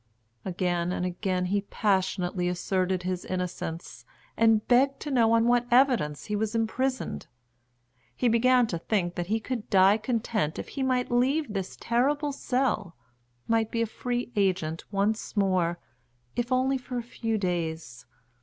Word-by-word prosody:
Again 175 Hz, -1 st, -1 dB
and 180 Hz, -, -2 dB
again 180 Hz, 0 st, -1 dB
he 200 Hz, +2 st, 0 dB
passionately 190 Hz, -3 st, 0 dB
asserted 185 Hz, +1 st, -1 dB
his 180 Hz, 0 st, -2 dB
innocence, 180 Hz, -2 st, -5 dB, 0.3 s
and 225 Hz, -1 st, +3 dB
begged 270 Hz, +3 st, +3 dB
to 295 Hz, -, -4 dB
know 230 Hz, -3 st, +4 dB
on 230 Hz, 0 st, +4 dB
what 240 Hz, 0 st, +3 dB
evidence 240 Hz, -, +3 dB
he 210 Hz, -, -2 dB
was 220 Hz, +2 st, -1 dB
imprisoned. 230 Hz, -, -1 dB, 0.9 s
He 250 Hz, -, +1 dB
began 245 Hz, +2 st, +4 dB
to 175 Hz, -7 st, -3 dB
think 175 Hz, -2 st, -1 dB
that 175 Hz, -1 st, -4 dB
he 220 Hz, +3 st, +1 dB
could 230 Hz, -1 st, -5 dB
die 195 Hz, +1 st, +5 dB
content 220 Hz, -, -1 dB
if -, -, -6 dB
he 275 Hz, -, -5 dB
might 255 Hz, -1 st, 0 dB
leave 260 Hz, +1 st, +1 dB
this 195 Hz, -2 st, -4 dB
terrible 285 Hz, +5 st, +1 dB
cell, 250 Hz, -9 st, -1 dB, 0.5 s
might 225 Hz, -1 st, +2 dB
be 230 Hz, 0 st, 0 dB
a -, -, +1 dB
free 245 Hz, +2 st, -3 dB
agent 185 Hz, -5 st, 0 dB
once 210 Hz, +2 st, -1 dB
more, 185 Hz, -4 st, +2 dB, 0.6 s
if 240 Hz, +1 st, -2 dB
only 260 Hz, +1 st, +2 dB
for 250 Hz, 0 st, -6 dB
a 240 Hz, -, -2 dB
few 225 Hz, -1 st, -3 dB
days. 160 Hz, -, -3 dB
215 Hz, 155 wpm, -27 LUFS, 180-245 Hz, 0.9 s, die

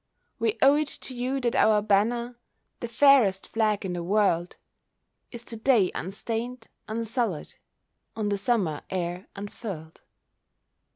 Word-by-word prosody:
We 225 Hz, -1 st, 0 dB
owe 275 Hz, +1 st, +7 dB
it 305 Hz, -1 st, 0 dB
to 260 Hz, -, -4 dB
you 255 Hz, +3 st, -1 dB
that 240 Hz, -2 st, 0 dB
our 215 Hz, -1 st, +5 dB
banner, 235 Hz, +4 st, +1 dB, 0.4 s
The 240 Hz, -, -4 dB
fairest 235 Hz, -6 st, +4 dB
flag 215 Hz, -3 st, 0 dB
in 180 Hz, -, -3 dB
the 175 Hz, -, -3 dB
world, 180 Hz, -2 st, +1 dB, 0.8 s
Is 235 Hz, -1 st, -8 dB
to 235 Hz, -, -8 dB
day 225 Hz, -5 st, +3 dB
unstained, 225 Hz, +5 st, -4 dB, 0.2 s
unsullied, 225 Hz, -, -2 dB, 0.6 s
On 215 Hz, -2 st, -1 dB
the 200 Hz, -, 0 dB
Summer 195 Hz, -9 st, 0 dB
air 180 Hz, 0 st, -3 dB
unfurled. 200 Hz, -5 st, -7 dB
220 Hz, 130 wpm, -26 LUFS, 195-240 Hz, 0.8 s, owe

